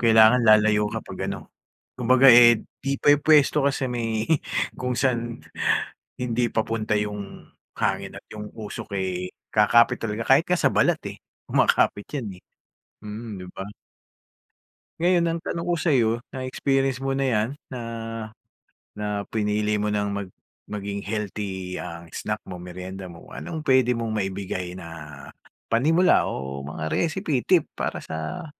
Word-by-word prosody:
kailangan 110 +1 +6
lalayo 105 0 +6
kapag - - -6
ano - - -2 0.6
kumbaga, 130 +2 +5
eh, 120 -2 +9 0.2
di 140 0 -1
pa - - -2
yung 145 - -8
pwesto 150 -2 +5
kasi 140 -1 +1
may 115 -3 -2 0.5
kung 125 0 -3
saan 120 -3 0 0.8
hindi 120 -1 0
papunta 110 -1 -1
yung 105 -1 -4 0.3
hangin - - -1
at - - -11
yung 105 0 -7
usok, 105 -2 -6
eh, 90 -1 -2 0.2
kakapit 110 +2 +4
talaga 110 0 -3
kahit 135 +6 +4
ka 180 - +3
sa - - +2
balat, - - +3
eh, - - -7 0.2
kumakapit 100 - +2
yan, 100 -9 -5
eh. - - -55 0.6
Mm 110 +2 -7
di 90 - -8
ba? 95 - -4 1.4
Ngayon 175 -1 +4
ang 165 0 -1
tanong 170 0 -3
ko 175 - +2
sayo 140 -9 +2 0.2
na-experience 135 0 -1
mo 135 0 -1
na 135 - +1
yan 110 -3 +1 0.2
na, 125 - -7 1.2
na 105 -1 -2
pinili 105 -1 0
mo 105 - -1
ng 105 -1 0
mag 100 -1 -4 0.4
maging 100 -1 -3
healthy 100 -3 -4
ang 85 0 -7
snack - - -3
mo, - - -6
meryenda 90 +2 -7
mo, 85 - -13
anong 75 - -5
pwede 130 -2 +4
mong 115 -1 -2
maibigay 95 -2 -3
na 90 - -9 0.8
panimula 160 +10 +4
o 70 0 -4
mga 80 +2 -5
recipe 160 - 0
tip 180 -5 +4
para - - -2
sa 80 - -5
110 Hz, 145 wpm, -24 LUFS, 100-130 Hz, 1.4 s, eh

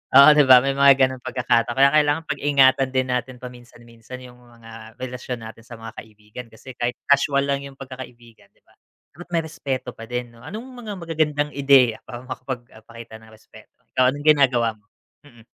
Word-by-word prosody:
oo, 140 +2 +9
'di 150 - +6
ba? 130 -1 +9
May 135 - 0
mga 140 0 +7
gano'ng 130 -1 -9
pagkakataon 120 -2 0
kaya 140 +1 +5
kailangan 150 +1 +2
pag-ingatan 135 -2 +2
din 130 0 +1
natin 125 0 -3
paminsan 120 -1 -12
minsan 115 +2 -12
yung 125 -1 -15
mga 115 -2 -15
relasyon 125 -2 -6
natin 115 +1 -11
sa 120 - -10
mga 115 -1 -10
kaibigan 105 +2 -12
kasi 115 +4 -13
kahit 120 0 -2 0.2
casual 140 0 +3
lang 140 0 -2
yung 135 - -14
pagkakaibigan 125 -3 -12
'di - - -36
ba - - -28 0.4
dapat 175 +3 -12
may 165 -1 +1
respeto 135 -5 -5
pa 115 - -11
din 125 0 -5
no. - - -18
Anong 215 +3 -7
mga 225 -4 -8
magagandang 150 -3 -1
ideya 135 -5 +4
para 120 0 -9
makapagpakita 115 -3 -9
ng 110 - -18
respeto? 110 - -18 0.2
ikaw 130 0 +2
anong 145 +1 -8
ginagawa 130 -6 +4
mo? 105 0 -35 0.4
Mm. 120 -5 -19
125 Hz, 185 wpm, -22 LUFS, 115-140 Hz, 0.4 s, oo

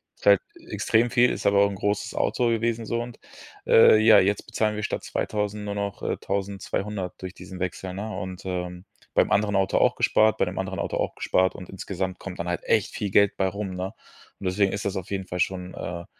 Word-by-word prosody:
Ist - - -16
halt 100 -1 +7 0.3
extrem 115 +2 +1
viel, 125 0 +5
ist - - -4
aber 100 0 +4
auch 100 - +3
'n 100 - -5
großes 100 +1 -2
Auto 120 - +1
gewesen 115 0 0
so, 115 0 -1
und, 120 -1 -10 0.5
äh, 110 -1 +8
ja, 110 -1 +7
jetzt 100 +2 +1
bezahlen 110 -1 0
wir 105 - -4
statt - - -3
2.000 105 0 -2
nur 100 0 -4
noch, 100 -1 -3
äh, - - -1
1.200 100 -1 -3
durch 95 0 -7
diesen 95 -1 -10
Wechsel, 90 0 -4
ne? 100 +4 -5
Und, 95 0 -6
ähm, 90 0 -4 0.3
beim - - +3
anderen 105 0 +2
Auto 95 -1 +2
auch - - +3
gespart, 110 0 +3
bei - - +3
dem 90 +1 -6
anderen 95 0 -3
Auto - - -2
auch - - -1
gespart 95 0 +1
und 90 - -10
insgesamt 95 -1 -4
kommt 95 -1 -8
dann 85 - -3
halt 85 - -2
echt 110 -3 +1
viel 100 -3 -3
Geld 100 -1 +4
bei 95 - +2
rum, 100 -1 -4
ne? 95 +3 -4 0.5
Und - - -8
deswegen 95 +1 +2
ist 100 - -4
das 100 - -1
auf 95 +1 -5
jeden 95 -1 -3
Fall 90 - -4
schon, 90 0 -2
äh, 85 -1 -5
100 Hz, 225 wpm, -25 LUFS, 95-105 Hz, 0.5 s, äh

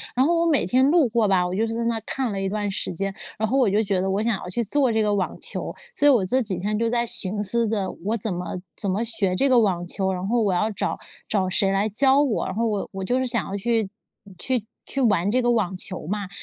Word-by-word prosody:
然 260 - +3
后 335 +2 +2
我 335 - +2
每 295 - +3
天 260 +2 +3
路 320 -4 +4
过 225 -1 +1
吧， 185 -2 +2
我 180 - -3
就 220 +4 0
是 225 - -2
在 235 - -2
那 230 -1 0
看 260 -5 -2
了 195 - -3
一 195 - -1
段 205 0 -2
时 195 - -1
间。 195 +3 -3 0.2
然 220 - 0
后 260 +5 0
我 240 - +3
就 210 +3 +2
觉 195 -3 0
得， 190 - -1
我 195 +2 0
想 230 -2 +1
要 180 - -8
去 235 +6 -1
做 260 +3 +2
这 220 -1 +1
个 210 -1 +1
网 195 -2 -2
球。 - - -2 0.2
所 290 - +3
以 290 - +8
我 225 -8 +3
这 255 +7 +2
几 205 -6 -3
天 210 +4 -2
就 230 - +1
在 235 0 +1
寻 210 -3 +2
思 230 +3 0
的： 205 -3 -1
“我 225 +2 0
怎 210 -1 -3
么 180 +1 -5 0.2
怎 200 - -2
么 200 +5 0
学 220 -5 +2
这 275 - +2
个 250 - +5
网 185 -6 0
球， 190 +2 -1
然 180 0 -4
后 235 +2 +1
我 205 -3 +1
要 215 +5 0
找 200 - -2 0.3
找 195 -3 0
谁 195 +1 +2
来 195 +2 +1
教 265 +6 +3
我。” 270 -7 0
然 190 - -5
后 230 - 0
我 205 -2 -2
我 190 - -5
就 245 +7 0
是 260 - 0
想 235 -4 +2
要 200 - -4
去 225 0 0 0.5
去 250 -2 0 0.2
去 275 - -2
玩 205 -6 +2
这 255 +4 +2
个 240 0 +2
网 200 -6 0
球 180 -3 -1
嘛。 200 0 -3
215 Hz, 300 characters per minute, -23 LUFS, 195-235 Hz, 0.5 s, 以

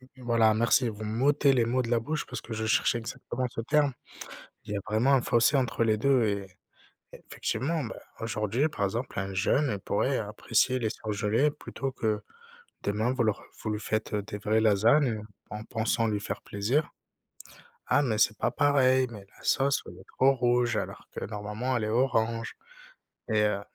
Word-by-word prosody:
et 130 0 -18
voilà 115 -2 +3
merci 115 +2 +3
vous 110 0 -6
m'ôtez 135 +6 +3
les 120 -3 +3
mots 125 +2 +1
de 115 - -5
la 120 - +3
bouche 150 +7 -3
parce 125 -3 -6
que 115 - -10
je 110 0 -2
cherchais 120 +2 +2
exactement 120 +2 -4
ce 115 - -5
terme. 145 +1 +2 0.7
Il 105 - -6
y - - -1
a - - -2
vraiment 110 +7 +2
un 130 - +3
fossé 120 +4 +3
entre 125 -3 +1
les 110 -1 +3
2 130 +1 +3
et 100 -2 -1 0.7
effectivement 145 +6 -3
ben, 115 - -6 0.2
aujourd'hui 115 +5 0
par 100 -8 -1
exemple 115 +3 -3
un 95 0 -4
jeune 130 +9 +2
il 100 - -3
pourrait - - 0
apprécier 130 0 +1
les 110 - 0
surgelés 110 +7 0
plutôt 135 -2 -5
que 110 -4 -1 0.6
demain 110 +5 0
vous 130 -2 0
leur 110 - 0 0.2
vous 110 - -2
lui 105 0 -2
faites, 110 0 -2
heu, 105 - 0
des 105 0 -7
vraies 110 +2 +1
lasagnes, 115 +7 +4
heu, - - -10 0.3
en 105 0 -6
pensant 115 0 0
lui 105 -1 -1
faire 100 0 -5
plaisir: 120 +10 -1 1.0
«Ah 145 +3 +4
mais 110 -6 0
c'est 105 -1 +3
pas - - +1
pareil, 130 -2 +3
mais 105 -4 -10
la - - -18
sauce 140 +1 +2
elle 90 - -10
est 95 - -15
trop 135 +1 +6
rouge 120 -2 +2
alors - - -4
que - - -5
normalement 105 +5 -3
elle 110 - -1
est - - -2
orange» 115 -1 0 0.7
et 110 -2 +2
heu, 105 -1 +1
115 Hz, 195 wpm, -28 LUFS, 105-130 Hz, 1.0 s, trop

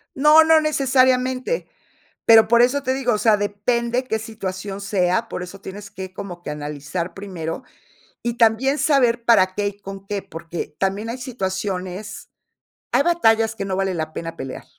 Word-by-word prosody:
No, 300 +3 +7
no 320 0 +5
necesariamente, 260 - +1 0.6
pero, 225 -1 +7
por 235 +1 +5
eso 255 +4 +3
te 260 - 0
digo, 260 -2 0
o - - +1
sea, 220 -1 +4
depende 235 +5 -1
qué 220 -3 -1
situación 200 -3 -6
sea, 195 +2 0
por 180 - -4
eso 180 +2 -10
tienes 200 +1 -9
que 190 0 -8
como 185 -3 -8
que - - -6
analizar 150 +4 -5
primero, 190 +2 -6 0.6
y 235 -1 -2
también 235 +4 +3
saber 245 -6 +2
para 185 -6 +4
qué 205 0 0
y 200 0 -10
con 195 0 -9
qué, 205 0 -2
porque, 165 -2 -7
también 195 +3 -1
hay 235 - -4
situaciones, 195 -4 -4 0.6
hay - - +4
batallas 225 -10 +3
que 195 - -4
no 190 -1 -2
vale 195 -1 0
la 155 -2 -3
pena 165 +1 -6
pelear. 130 -1 -7
205 Hz, 170 wpm, -21 LUFS, 185-245 Hz, 0.6 s, No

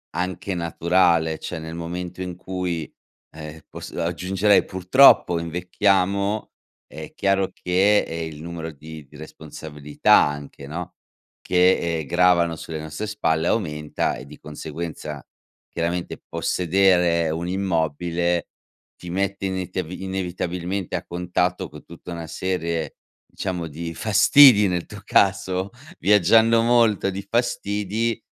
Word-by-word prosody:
anche 90 +1 -3
naturale, 85 -1 +2
cioè, 85 - -6
nel 80 +1 -7
momento 90 +2 -5
in 90 -1 -6
cui, 90 -3 -4 0.4
ehm, 80 0 -9
poss - - -9
aggiungerei, 90 +4 +1
purtroppo, 95 -1 +5
invecchiamo, 95 +4 0 0.4
è 80 +2 -10
chiaro 95 -1 +1
che, 95 +3 +3
ehm, 80 0 -4
il 75 - -11
numero 80 -1 -6
di 80 0 -11
di 75 - -19
responsabilità, 75 -1 -1
anche, 70 -1 0
no, 85 +4 -7 0.5
che, 90 -2 +2
ehm, 75 - -5
gravano 85 -1 +3
sulle 80 0 -7
nostre 80 +7 -5
spalle 80 -6 0
aumenta, 75 -9 -1
e 65 - -9
di 75 +2 -13
conseguenza, 75 -1 -7 0.5
chiaramente, 85 +1 -3
possedere 90 -2 +2
un 85 +2 -3
immobile 85 -1 -1 0.5
ti 90 - -8
mette 100 +1 -2
inetiav 95 -2 -4
inevitabilmente 90 0 -4
a - - -3
contatto 90 0 -2
co 75 - -12
tutta 85 +1 -11
una 85 -1 -6
serie, 85 -4 -3 0.3
diciamo, 90 -4 -4
di 85 +2 -6
fastidi 105 - +6
nel 90 -2 -2
tuo 105 -2 -11
caso, 95 0 +1 0.3
viaggiando 110 +4 +5
molto 115 -4 +3
di 95 +1 -6
fastidi, 115 -2 -1
90 Hz, 120 wpm, -23 LUFS, 80-95 Hz, 0.5 s, fastidi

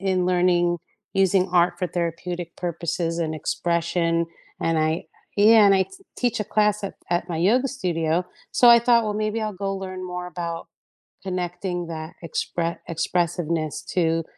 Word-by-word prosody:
in 185 -2 +1
learning 175 -1 +3 0.4
using 190 -1 +3
art 175 0 +4
for 180 - 0
therapeutic 170 0 -4
purposes 170 -1 -2
and 160 -2 -1
expression, 170 +1 0 0.3
and 165 0 +1
I 155 +1 0 0.3
yeah, 215 0 +7
and 195 - +6
I 190 0 +3
t - - -26 0.3
teach 245 -2 0
a - - 0
class 210 0 +1
at 200 - -4
at 175 +1 0
my 165 - -2
yoga 240 +10 +3
studio, 175 - 0 0.3
so 245 - +5
I 235 0 +9
thought, 235 -1 +4
"Well, 210 - -2
maybe 215 +1 -1
I'll 215 -1 -2
go 195 - 0
learn 185 -1 -6
more 180 0 -5
about 170 -1 -5 0.6
connecting 180 -1 -3
that 160 0 -6
expre 170 +1 -2
expressiveness 170 -2 -1
to 165 -2 +2
175 Hz, 160 wpm, -24 LUFS, 170-195 Hz, 0.6 s, I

